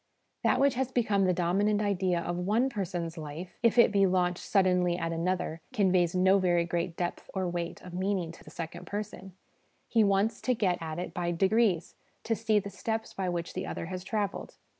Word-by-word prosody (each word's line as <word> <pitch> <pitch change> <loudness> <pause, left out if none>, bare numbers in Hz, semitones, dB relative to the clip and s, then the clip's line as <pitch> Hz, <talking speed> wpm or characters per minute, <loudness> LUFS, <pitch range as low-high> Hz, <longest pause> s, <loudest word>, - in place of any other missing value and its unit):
That - - +3
which 275 -1 +4
has 260 +1 -1
become 215 -6 +2
the 185 - +3
dominant 190 +4 +1
idea 190 -4 +1
of 175 +1 -3
one 210 +9 +1
person's 175 -5 -3
life, 155 +4 -8
if 235 0 +3
it 235 - +7
be 200 -1 +4
launched 180 -1 +1
suddenly 180 -3 +2
at 165 -1 -2
another, 165 -1 -1
conveys 185 -6 +2
no 190 +2 +5
very 175 -2 +2
great 170 0 -2
depth 175 -1 -3
or 190 -1 0
weight 175 -1 -4
of 180 - -10
meaning 185 -2 -1
to 165 - -15
the - - -13
second 170 +1 -7
person 195 -2 -6 0.5
he 225 -2 +3
wants 200 +2 +2
to 255 - +1
get 185 -5 +1
at 160 -1 -4
it 180 - -4
by 175 -1 -1
degrees, 190 0 +2 0.3
to 225 - 0
see 220 -1 +1
the 200 -1 -2
steps 220 +3 -3
by 190 -2 -2
which 170 -1 -3
the - - -4
other - - -4
has 180 +1 -5
travelled. 205 0 -3
185 Hz, 200 wpm, -29 LUFS, 175-205 Hz, 0.5 s, it